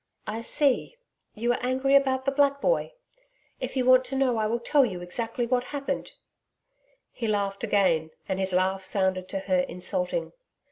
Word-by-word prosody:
'I 220 +2 -4
see 280 - +1 0.4
you 235 +2 0
are 240 - 0
angry 260 +2 +1
about 265 -1 +3
the 275 - +2
black 280 0 +2
boy. - - 0 0.7
If - - -4
you 255 - +1
want 255 0 +6
to 260 +2 -3
know 260 -3 +2
I 215 -1 +1
will 230 +2 0
tell 280 +4 +3
you 190 -8 -2
exactly 225 +7 -3
what 245 +1 0
happened.' 280 0 -4 1.0
He 230 - -4
laughed 200 -1 -1
again 185 -7 +2 0.2
and 190 -1 -2
his 190 0 -1
laugh 190 +1 +1
sounded 185 -1 0
to 195 - -2
her 185 -2 +1
insulting. 270 - -2
235 Hz, 175 wpm, -26 LUFS, 190-270 Hz, 1.0 s, want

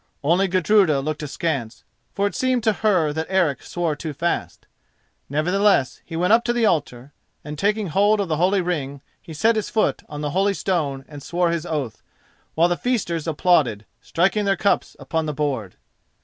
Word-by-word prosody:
Only 175 +6 +3
Gudruda 185 -4 +3
looked 150 +2 -3
askance, 140 -5 -3 0.3
for 200 - -1
it 205 - -1
seemed 255 -2 0
to 220 -1 +3
her 185 -8 +1
that 160 +1 -3
Eric 175 -9 +1
swore 170 -3 -2
too 155 +1 -6
fast. 170 +5 -3 0.6
Nevertheless 175 0 +1
he 165 - -8
went 180 +5 +2
up 235 +1 +5
to 240 - +1
the 240 -2 +2
altar, 145 - -1 0.3
and, 150 +1 -6
taking 205 +5 0
hold 205 +6 +3
of 200 - -1
the 155 -2 -1
holy 185 +4 +2
ring, 140 -6 -3 0.2
he - - -12
set 225 +9 +3
his 215 - -2
foot 220 - 0
on 150 0 -6
the 145 -1 -2
holy 195 +3 +1
stone 150 -7 -2
and 145 -2 -10
swore 175 +3 0
his 170 0 -3
oath, 135 -9 -3 0.5
while 165 +2 +4
the 175 0 -1
feasters 175 -10 -1
applauded, 150 - +2 0.2
striking 195 +5 +1
their 195 -1 +2
cups 200 - 0
upon 160 -1 -2
the 150 - -3
board. 130 -10 -2
170 Hz, 185 wpm, -22 LUFS, 150-195 Hz, 0.6 s, up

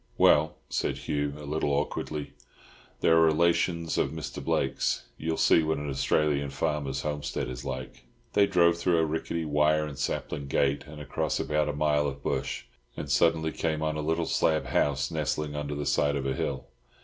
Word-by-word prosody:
"Well," - - +5
said - - -1
Hugh, 75 -1 -2
a 75 - -9
little 75 0 -1
awkwardly, 70 0 -2 0.7
"they - - +3
are 80 0 +6
relations 85 +1 +2
of - - +2
Mr. - - -6
Blake's. 65 0 0
You'll 80 0 -2
see - - +5
what 80 0 0
an 75 -1 -4
Australian 70 +1 +1
farmer's 70 -2 -2
homestead 75 -1 -3
is 60 0 -6
like." 65 -2 -6 0.3
They 100 -1 +5
drove 85 -3 +4
through 85 0 +2
a 80 - +3
rickety 80 +1 -2
wire 75 +1 +2
and 70 -2 -8
sapling 70 0 -3
gate 70 +1 +1
and 75 0 -10
across 75 - -2
about 75 0 0
a - - -1
mile 75 0 +2
of 70 0 -6
bush, - - -2 0.3
and - - -4
suddenly 80 -1 +3
came 80 -1 -1
on 80 0 0
a 75 - -2
little 80 +2 0
slab 80 -3 +1
house 70 +1 +1
nestling 75 -1 -2
under 75 0 -3
the 75 0 -3
side 70 0 +2
of 70 -1 -2
a 65 - 0
hill. - - -3
75 Hz, 185 wpm, -28 LUFS, 70-80 Hz, 0.7 s, are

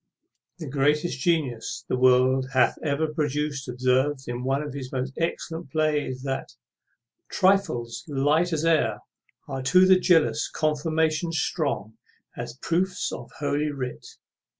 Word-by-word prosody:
The 165 - -7
greatest 145 +1 +1
genius 135 -7 -1
the - - 0
world 130 +1 +4
hath 130 -1 +3
ever 150 +1 0
produced 150 -2 -2
observes, 130 +3 0
in 120 +1 -4
one 135 +3 0
of 145 - -6
his 130 -2 -6
most 130 0 -3
excellent 165 -1 -3
plays, 150 -3 -1
that 135 -1 -4 0.8
Trifles, 185 - +1
light 150 +4 +2
as 160 0 -1
air, 150 -11 +2 0.5
Are 135 -2 -4
to 180 +8 +5
the 185 0 +6
jealous 165 -4 +3
confirmations 155 +2 0
strong 115 - -2 0.4
As 120 +1 -7
proofs 180 +2 0
of - - -7
holy 145 +1 0
writ. 130 -4 -5
145 Hz, 130 wpm, -25 LUFS, 130-160 Hz, 0.8 s, the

